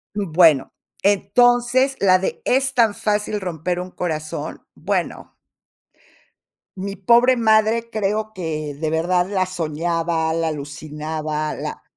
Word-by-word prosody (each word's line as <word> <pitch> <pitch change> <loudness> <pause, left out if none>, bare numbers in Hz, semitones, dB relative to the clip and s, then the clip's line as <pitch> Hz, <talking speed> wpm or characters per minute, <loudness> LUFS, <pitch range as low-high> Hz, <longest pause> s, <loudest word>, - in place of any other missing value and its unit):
Bueno, 165 -7 +3 0.3
entonces 245 +6 +3
la 185 -2 +4
de 190 - -3
"Es 265 +1 +1
tan 225 -4 +4
fácil 210 0 -1
romper 175 0 -3
un 180 +1 -6
corazón". 155 -4 -4
Bueno - - -3 1.4
mi 195 +1 -5
pobre 240 +6 +4
madre 220 +1 +2
creo 215 0 -2
que 155 -5 -4
de 155 +2 -3
verdad 175 +3 +1
la 190 -2 +1
soñaba, 165 -1 -1
la 165 0 0
alucinaba, 155 +1 -4
la - - -6
185 Hz, 115 wpm, -21 LUFS, 160-215 Hz, 1.4 s, la